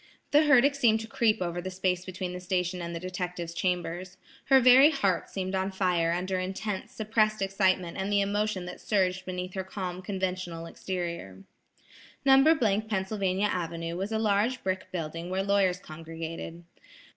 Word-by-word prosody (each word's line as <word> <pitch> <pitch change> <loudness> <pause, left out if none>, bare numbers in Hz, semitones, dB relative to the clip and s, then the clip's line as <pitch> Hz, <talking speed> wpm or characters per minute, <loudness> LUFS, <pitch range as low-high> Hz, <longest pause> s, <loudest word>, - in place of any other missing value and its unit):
The 295 +1 +5
herdic 280 -1 +5
seemed 235 -6 +3
to 225 - -7
creep 220 -3 +1
over 175 0 -3
the 185 - -5
space 185 -1 -1
between 185 -1 -5
the 180 - -5
station 180 -1 -1
and 170 0 -5
the - - -3
detective's 180 -2 -4
chambers. 180 0 -2 0.3
Her 270 -1 +6
very 255 +3 +8
heart 200 - 0
seemed 185 -1 -4
on 190 0 0
fire 180 -3 +1
under 185 +2 -1
intense, 190 +2 -4
suppressed 215 0 +1
excitement 190 -3 +1
and 190 +2 -2
the 205 - +3
emotion 200 -1 0
that 180 - -8
surged 185 -2 0
beneath 180 0 -4
her 190 - -3
calm, 185 -1 -5
conventional 185 -3 -3
exterior. 170 - -5 0.8
No. 270 -6 +5
— 220 - -17
Pennsylvania 195 -1 0
Avenue 165 -1 -3
was 195 +4 -3
a 220 - 0
large 220 +3 +1
brick 185 -1 -3
building 165 0 -4
where 190 +1 -1
lawyers 195 -2 +2
congregated. 165 0 -7
185 Hz, 165 wpm, -28 LUFS, 180-205 Hz, 0.8 s, very